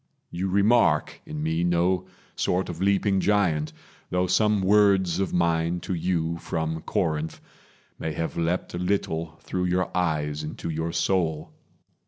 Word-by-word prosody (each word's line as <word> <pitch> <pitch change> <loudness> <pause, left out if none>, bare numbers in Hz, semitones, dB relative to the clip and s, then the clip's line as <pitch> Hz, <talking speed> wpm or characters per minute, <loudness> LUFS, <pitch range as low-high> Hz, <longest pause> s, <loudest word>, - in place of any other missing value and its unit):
You 90 +3 -2
remark 100 -5 +3
in 75 0 -4
me 80 +2 0
No 90 +2 +1 0.3
sort 90 +1 0
of 85 0 -6
leaping 100 0 +2
giant, 90 -7 +1 0.4
though 90 0 +1
some 100 +2 +2
words 95 -3 +4
Of 95 - 0
mine 85 0 +1
to 95 - -3
you 85 -1 -1
from 80 0 -3
Corinth 80 0 -1 0.6
may 80 - -3
have 80 +2 -3
leapt 85 +2 -1
A 90 - -3
little 85 -4 -1
through 90 0 -2
your 90 +1 0
eyes 75 -4 0
into 80 +2 -5
your 80 +1 -2
soul. 80 -2 0
85 Hz, 145 wpm, -25 LUFS, 80-95 Hz, 0.6 s, words